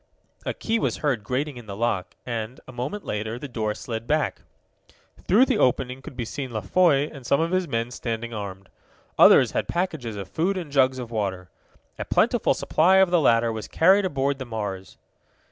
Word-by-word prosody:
A - - -2
key 225 +1 -1
was - - -1
heard 125 -8 +1
grating 135 +3 -2
in 120 -3 -11
the 100 - -6
lock, 110 -4 -2
and, 115 +1 -4
a - - -9
moment 130 +12 -5
later, 110 +2 -3
the 145 - -7
door 110 -4 -2
slid 115 -1 -6
back. 155 0 0 0.9
Through 220 +8 +6
the 255 -6 0
opening 130 +1 +1
could 130 - -11
be 120 - -2
seen 130 +4 -5
La 110 -3 -4
Foy 150 -2 +3
and 140 -3 -10
some 130 +3 +2
of 165 +1 0
his 185 -1 +1
men 115 -1 -2
standing 115 -1 -4
armed. 100 -3 -6 0.5
Others - - +7
had - - -2
packages 160 - -2
of 100 -2 -6
food 185 +4 -1
and 165 -6 -6
jugs 130 -2 +3
of 120 -2 -6
water. 95 -5 -3 0.5
A - - -3
plentiful - - +2
supply 180 +5 +3
of 190 -2 +5
the 175 -2 +4
latter 115 -3 +3
was 110 -1 -5
carried 190 +5 +4
aboard 140 -4 -1
the 130 - -5
Mars. 105 -5 -5
125 Hz, 195 wpm, -24 LUFS, 110-155 Hz, 0.9 s, Others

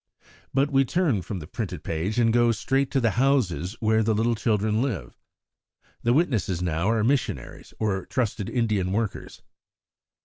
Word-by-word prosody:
But 140 +2 +1
we 135 0 +4
turn 140 - +1
from 95 +3 -5
the 80 - -7
printed 90 -3 -5
page, 85 +7 -2
and 115 -2 +3
go 120 0 +4
straight 135 +4 0
to 135 - +1
the 115 -3 +2
houses 115 -8 +1
where 110 0 +2
the 110 0 +1
little 115 +2 +2
children 110 -1 +1
live. 105 - -3 0.9
The 120 - +2
witnesses 120 - +1
now 85 +2 0
are 115 -1 +2
missionaries 135 +3 -2
or 95 -4 -1
trusted 110 -5 -2
Indian 105 -6 0
workers. 110 -1 -3
110 Hz, 160 wpm, -25 LUFS, 95-125 Hz, 0.9 s, we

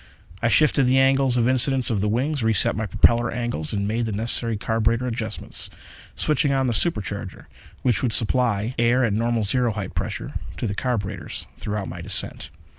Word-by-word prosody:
I 120 - +2
shifted 140 0 +3
the 130 +1 +3
angles 135 -1 +3
of 120 -1 +2
incidence 130 0 +2
of 105 -4 0
the 105 - 0
wings, 135 +6 -1
re 110 0 +2
set - - +4
my 110 +1 -2
propeller 120 +5 +3
angles 120 -11 -3
and 100 -1 -1
made 115 +2 -1
the - - -3
necessary 115 +1 +1
carburetor 115 +3 0
adjustments, 115 -2 -4 0.5
switching 150 -1 +1
on 135 -1 +1
the 120 - 0
supercharger 110 - -1 0.4
which 125 -4 +2
would 125 - 0
supply 115 -1 +1
air 120 +2 +3
at 105 - 0
normal 115 +1 0
zero 120 +3 +1
height 100 -3 -5
pressure 100 +9 -4 0.2
to - - -3
the 100 - -2
carburetors 105 -3 -3
throughout 105 -2 -4
my - - -7
descent. - - 0
115 Hz, 185 wpm, -23 LUFS, 105-125 Hz, 0.5 s, set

